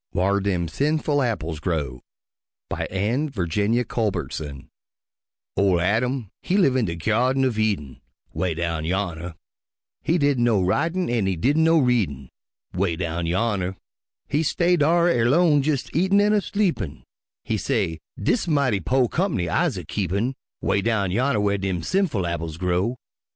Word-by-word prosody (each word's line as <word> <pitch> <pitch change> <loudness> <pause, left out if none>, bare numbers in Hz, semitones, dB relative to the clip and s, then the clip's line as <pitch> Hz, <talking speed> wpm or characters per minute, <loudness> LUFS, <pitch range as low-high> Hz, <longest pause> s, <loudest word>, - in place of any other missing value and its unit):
WHAR 100 +2 +2
DEM 95 -4 -1
SINFUL 145 - 0
APPLES 85 - -2
GROW 75 -7 -2 0.7
BY - - -2
ANNE 115 +11 0
VIRGINIA 105 - 0
CULBERTSON 80 - -3 0.8
Ol' 95 -3 +3
Adam 110 +5 0
he 190 - 0
live 140 -10 +4
in 125 -3 +2
de 85 -3 -3
Gyardin 125 +9 +1
uv 120 -4 0
Eden, 95 -12 -1 0.3
('Way 90 -3 -1
down 85 -1 -2
yonner) 85 -1 -3 0.7
He 170 - +1
didn' 140 -5 +2
know 115 -4 +3
writin' 160 - 0
an' 115 -5 0
he 95 - 0
didn' 145 - +2
know 165 +1 +5
readin', 100 - +1 0.4
('Way 90 -2 0
down 85 0 -3
yonner) 95 0 0 0.5
He 145 +2 +1
stay 175 +3 +2
dar 170 +2 +3
erlone 150 +2 +4
jes' 145 -3 0
eatin' 190 +5 +3
an' 210 +1 +3
a 210 - +3
sleepin', 175 - -2 0.4
He - - -1
say, 80 -1 -1 0.2
"Dis 185 - 0
mighty 140 -10 +2
po' 125 +7 +2
comp'ny 160 - -1
I'se - - +1
a - - -6
keepin'," 100 +6 -1 0.3
'Way 100 - +1
down 100 -4 0
yonner 120 +3 +1
whar 100 -1 +1
dem 95 -3 -2
sinful 180 - 0
apples 85 -2 -3
grow. 90 +7 0
105 Hz, 150 wpm, -23 LUFS, 90-140 Hz, 0.8 s, know